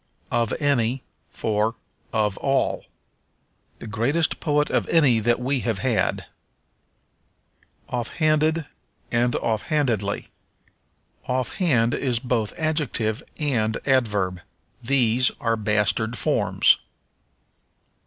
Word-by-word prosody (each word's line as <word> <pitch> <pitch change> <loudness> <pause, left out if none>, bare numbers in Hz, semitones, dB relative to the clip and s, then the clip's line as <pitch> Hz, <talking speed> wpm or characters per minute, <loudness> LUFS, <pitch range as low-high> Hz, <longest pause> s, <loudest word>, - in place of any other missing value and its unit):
Of 115 -2 +1
Any 130 -4 +1 0.3
for 110 +2 -1 0.4
Of 105 -4 +1
All. 135 -1 0 0.9
"The - - -10
greatest 120 +10 0
poet 150 -1 +1
of - - 0
any 140 -9 +4
that 120 +2 +1
we 130 +2 0
have 115 -4 -1
had." 125 -1 0 1.6
Offhanded 155 +5 +1 0.5
and 120 0 +1
Offhandedly. 110 - -1 1.0
Offhand 125 -1 +1
is 125 -4 0
both 120 -3 -1
adjective 150 -9 -1 0.2
and 115 -8 0
adverb; 105 -9 +1 0.4
these 125 0 +3
are 115 -1 +1
bastard 110 +2 0
forms. - - +3
120 Hz, 90 wpm, -24 LUFS, 110-140 Hz, 1.6 s, any